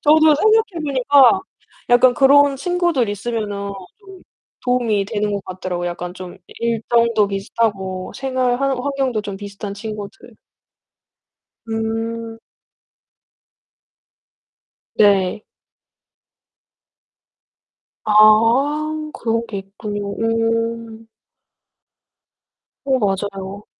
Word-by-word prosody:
저도 310 0 +5
생각해 435 0 +2
보니까 280 +5 +4 0.5
약간 245 0 +5
그런 280 +1 +5
친구들 345 - 0
있으면은 205 -1 -4 0.3
좀 385 -2 -14 0.4
도움이 235 -5 +1
되는 210 0 -2
것 200 -1 -4
같더라고요. 180 -1 -4
약간 175 +1 -6
좀 180 -1 -9
이 - - -15
일정도 230 -1 +1
비슷하고 195 -2 -2
생활 255 -1 -1
환 275 - +1
환경도 265 -4 -1
좀 200 -2 -6
비슷한 200 0 -7
친구들. 210 +2 -8 1.4
음. 225 0 -4 2.6
네. 200 -1 +3 2.6
아, 265 +9 +3
그런 230 0 -2
게 200 -3 -5
있군요. 200 +1 -6
음. 225 0 -2 1.8
어, 265 -1 +1
맞아요. 195 -1 -3
225 Hz, 175 characters per minute, -19 LUFS, 205-260 Hz, 2.6 s, 저도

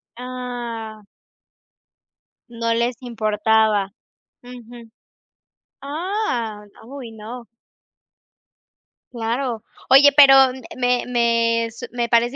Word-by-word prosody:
Ah. 240 -3 -7 1.5
No 230 -1 -2
les 235 +2 0
importaba. 215 -3 0 0.5
Ujú. 240 -2 -13 0.9
Ah, 280 - -3
n 205 - -22 0.2
uy, 260 -4 -9
no. 230 +3 -10 1.7
Claro. 235 0 -3 0.3
Oye, 280 +2 +7
pero 270 -2 +8
m 260 +1 -10
me 245 -1 0
me 230 -1 +1
su 230 - -9
me 240 -1 -2
parece 235 +2 +2
235 Hz, 85 wpm, -21 LUFS, 225-250 Hz, 1.7 s, pero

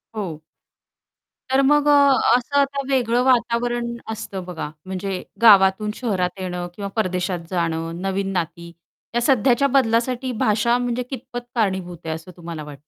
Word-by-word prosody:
हो. 180 -8 -4 1.1
तर 265 +1 +4
मग 295 +2 +3
अ, 280 -5 +5
असं 260 +3 -3
आता 280 0 +1
वेगळं 245 -2 +2
वातावरण 240 -1 +1 0.2
असतं 195 -3 -6
बघा. 175 -4 -5 0.2
म्हणजे 190 0 -4 0.2
गावातून 205 -1 +6
शहरात 195 -6 -2
येणं 180 -1 -4
किंवा 200 0 -5
परदेशात 185 -4 -1
जाणं, 165 -1 -2
नवीन 195 0 -2
नाती. 170 -1 -4 0.4
या 240 - +2
सध्याच्या 260 +1 +3
बदलासाठी 255 0 +1
भाषा 220 +3 +2
म्हणजे 245 0 -2
कितपत 255 -1 -6 0.2
कारणीभूत 190 -6 -1
आहे, 160 0 -2
असं 160 +3 -10
तुम्हाला 165 -2 -7
वाटतं? 145 -2 -11
215 Hz, 140 wpm, -22 LUFS, 180-245 Hz, 1.1 s, गावातून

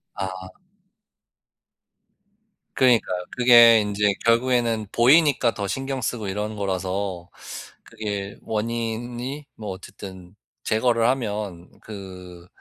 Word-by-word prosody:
아. 95 -1 -6 2.2
그러니까요. 110 -8 +2
그게 120 -2 +8
인제 105 0 +1
결국에는 115 -2 +2
보이니까 130 -1 +4
더 100 -1 -4
신경 135 +5 -3
쓰고 115 -2 -3
이러는 105 +2 -3
거라서 95 -2 -3 0.5
그게 100 -2 -5
원인이 120 +5 -3
뭐 105 -2 -7
어쨌든 95 -1 -10 0.3
제거를 115 +1 +2
하면 105 -8 -3
그 90 -4 -10
105 Hz, 210 characters per minute, -23 LUFS, 95-120 Hz, 2.2 s, 그게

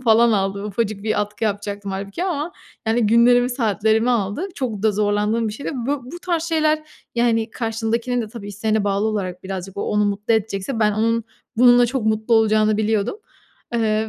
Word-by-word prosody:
falan 235 -1 +4
aldı. 200 0 -1
Ufacık 210 0 -2
bir 215 -1 0
atkı 210 +2 -3
yapacaktım 205 -1 -3
hâlbuki 195 - -4
ama, 335 -2 -2 0.3
yani, 225 0 +2
günlerimi, 245 +2 +5
saatlerimi 220 -1 +1
aldı. 230 - -1
Çok 230 -7 -3
da 220 -1 +3
zorlandığım 210 +2 +1
bir - - -4
şeydi. 220 - -5
Bu 260 +2 -2
bu 350 - -6
tarz 340 -3 0
şeyler, 310 -2 +1 0.3
yani, 230 -1 +1
karşındakinin 230 +1 -1
de 220 - -6
tabii, 210 -2 -9
isteğine 215 +1 -1
bağlı 200 +1 +1
olarak 185 -4 -3
birazcık, 190 0 -6
o 200 - -2
onu 210 0 +1
mutlu 205 +2 0
edecekse 220 +2 -2
ben 210 -1 +3
onun 230 +1 +1 0.3
bununla 245 0 +6
çok 240 -3 -2
mutlu 220 +2 +2
olacağını 215 -1 +3
biliyordum. 220 - 0 0.6
Eee, 220 -1 +1
220 Hz, 175 wpm, -21 LUFS, 205-240 Hz, 0.6 s, bununla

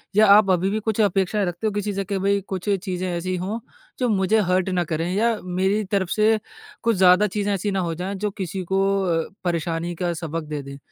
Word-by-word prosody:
या 215 +1 +6
आप 200 0 +7
अभी 185 +1 +2
भी 215 +2 -1
कुछ 220 0 0
अपेक्षाएँ 200 0 +1
रखते 175 +4 -2
हो 210 - -1
किसी 205 0 -2
से 195 0 -2
कि 200 +1 -2
भई 200 +1 +2
कुछ 190 +1 -4
चीज़ें 185 -2 -1
ऐसी 180 +1 -2
हो 195 +6 -3 0.4
जो 250 -2 +1
मुझे 205 +1 +2
हर्ट 185 +1 +2
ना 180 -1 +1
करें 165 +1 -2
या 230 +2 +2
मेरी 190 +4 0
तरफ़ 195 -3 +1
से 215 +1 +3 0.4
कुछ 230 -1 +2
ज़्यादा 185 +2 +6
चीज़ें 205 +1 -1
ऐसी 200 +1 -1
ना 195 - 0
हो 170 -2 -1
जाएँ 185 +4 -4
जो 205 +2 -2
किसी 190 -1 -4
को 195 0 +3 0.2
अ, 165 -3 0
परेशानी 170 0 -2
का 175 0 -1
सबक 165 0 -4
दे 150 -1 -3
दें 140 0 -9
190 Hz, 225 wpm, -23 LUFS, 175-205 Hz, 0.4 s, आप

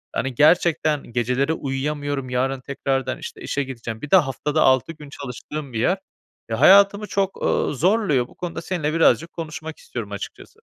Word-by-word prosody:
hani, 130 -2 -2
gerçekten 155 -1 +3
geceleri 125 +6 0
uyuyamıyorum. 145 -1 -3
"Yarın 130 +1 0
tekrardan, 135 -1 -2
işte, - - -8
işe 140 - -2
gideceğim." 120 -3 -7
Bir 150 - -7
de - - +8
haftada 150 0 0
6 130 +4 +3
gün 150 -3 -12
çalıştığım 140 0 -7
bir 110 - -2
yer. 180 - +2 0.5
Ya, 110 +1 -2
hayatımı 200 +5 +6
çok, 195 -1 -1
ııı, - - +1
zorluyor. 165 - +2
Bu - - -20
konuda 175 -2 -5
seninle 165 -4 -2
birazcık 165 0 +3
konuşmak 160 -1 -6
istiyorum 110 -4 -7
açıkçası. 100 - -8
145 Hz, 160 wpm, -22 LUFS, 130-165 Hz, 0.5 s, de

